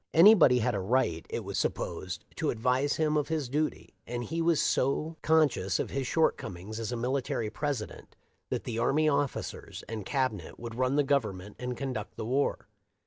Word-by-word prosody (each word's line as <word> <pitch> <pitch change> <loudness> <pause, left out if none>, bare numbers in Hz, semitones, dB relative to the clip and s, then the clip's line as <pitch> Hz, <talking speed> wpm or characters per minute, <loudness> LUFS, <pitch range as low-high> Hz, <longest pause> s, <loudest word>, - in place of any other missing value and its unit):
Anybody 170 - +8
had 125 +1 +1
a 100 - -1
right, 95 -5 0
it - - -3
was - - -3
supposed, 95 +4 -3
to 155 - 0
advise 125 +5 +1
him 155 -1 +1
of 150 -1 +1
his 155 -4 -1
duty; 150 +4 -2
and 120 0 -3
he 165 +6 -2
was 165 -2 +3
so 150 +5 +1
conscious 150 -12 +3
of - - -3
his 135 -2 -2
shortcomings 110 - -1
as 115 +1 -3
a 120 - -2
military 120 -3 -1
Presi 140 -4 -2
dent - - -14 0.3
that - - -2
the 115 -1 -3
army 155 +6 +3
officers 145 -2 -2
and 110 -1 -5
Cabinet 130 - -2
would 115 -1 -6
run 130 +3 +1
the 145 - +4
Government 105 -9 -1
and 125 0 -4
conduct 130 -6 -4
the - - -5
war. 135 +5 0
130 Hz, 185 wpm, -29 LUFS, 110-145 Hz, 0.3 s, Anybody